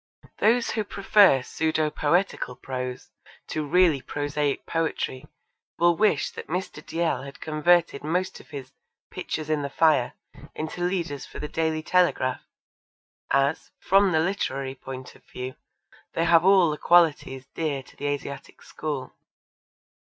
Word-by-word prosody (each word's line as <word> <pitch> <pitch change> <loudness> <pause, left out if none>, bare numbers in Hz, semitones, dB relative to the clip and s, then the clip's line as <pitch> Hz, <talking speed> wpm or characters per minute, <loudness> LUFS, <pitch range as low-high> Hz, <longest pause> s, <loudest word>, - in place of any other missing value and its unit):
Those 235 +3 +3
who 220 - -1
prefer 200 -8 +4
pseudo 155 +2 0
poetical 165 -5 0
prose 125 -1 -6 0.4
to 155 - -2
really 160 -2 +3
prosaic 145 0 -2
poetry 160 -5 -2 0.5
will 175 0 +4
wish 205 -7 +2
that - - -9
Mr. 180 +4 -4
Dalziel 165 -5 -1
had 140 +1 -10
converted 160 0 +2
most 180 +5 -1
of - - -17
his 135 -3 -8 0.4
Pictures 155 -1 -4
in 155 -1 0
the 140 - -3
Fire 150 -4 +3 0.4
into 160 +3 -5
leaders 170 -6 -2
for - - -11
the 150 - -4
Daily 160 0 -1
Telegraph, 175 -8 +2 0.9
as, 140 +3 +1
from 195 0 +4
the 160 - +3
literary 140 -7 -1
point 130 -1 -9
of - - -21
view, 125 +1 -6 0.6
they 165 - +1
have 165 -1 +5
all 190 -4 +5
the 150 - -5
qualities 150 -6 +3
dear 145 -4 -2
to - - -19
the 145 - -4
Asiatic 140 -1 -5
school. 145 -4 -5
155 Hz, 140 wpm, -25 LUFS, 140-175 Hz, 0.9 s, have